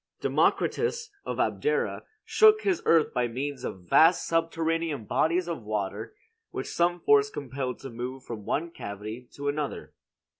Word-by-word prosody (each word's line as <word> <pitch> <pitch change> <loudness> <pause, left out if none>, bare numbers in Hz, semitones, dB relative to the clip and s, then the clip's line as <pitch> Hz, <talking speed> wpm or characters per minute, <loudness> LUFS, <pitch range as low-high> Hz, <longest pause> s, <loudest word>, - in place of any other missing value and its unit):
Democritus, 460 -1 +1
of - - -4
Abdera, 460 +1 0 0.2
shook 435 0 +6
his 375 -4 +1
earth 165 -2 +4
by 125 -1 +1
means 135 +4 -4
of 90 -2 -6
vast 165 - +5
subterranean 165 -4 0
bodies 170 - +1
of 170 -7 -4
water 105 - -4 0.3
which - - -5
some 175 +1 +2
force 145 -1 +5
compelled 130 -2 -4
to 135 - -9
move 125 +3 -6
from 110 -3 -7
one 165 +10 -2
cavity 110 +1 -7
to 145 0 -5
another. 145 0 -3
145 Hz, 145 wpm, -27 LUFS, 125-170 Hz, 0.3 s, shook